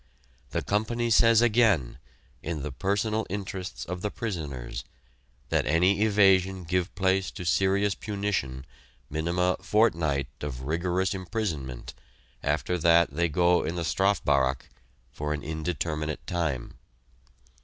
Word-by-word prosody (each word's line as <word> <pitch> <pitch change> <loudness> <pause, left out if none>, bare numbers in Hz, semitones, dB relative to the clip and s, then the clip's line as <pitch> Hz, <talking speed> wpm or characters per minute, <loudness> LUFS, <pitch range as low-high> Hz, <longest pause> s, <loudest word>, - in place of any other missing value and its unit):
The - - -2
Company 115 +3 0
says 115 +1 +6
again, 105 - +3 0.4
in 80 -3 -4
the 75 - -4
personal 105 - -1
interests 95 -1 -5
of 90 +1 -5
the 105 - -1
prisoners, 75 - -5 0.7
that - - +1
any 90 +7 +3
evasion 95 -3 +4
give 90 +2 -1
place 95 +1 +1
to 90 - -8
serious 95 +3 +2
punition 100 -13 -3 0.5
(minima) 85 +4 0
fortnight 80 - +2
of 65 -3 -5
rigourous 90 +5 0
imprisonment 90 - -4 0.5
after 90 0 0
that 85 -1 +4
they 85 +4 0
go 85 +3 +3
in 80 +3 -3
the 85 -1 -2
"Strafbaracke" 75 -11 +1 0.4
for 75 +3 -3
an 70 - -7
indeterminate 80 -1 -3
time. 80 -8 -3
90 Hz, 120 wpm, -27 LUFS, 75-100 Hz, 0.7 s, says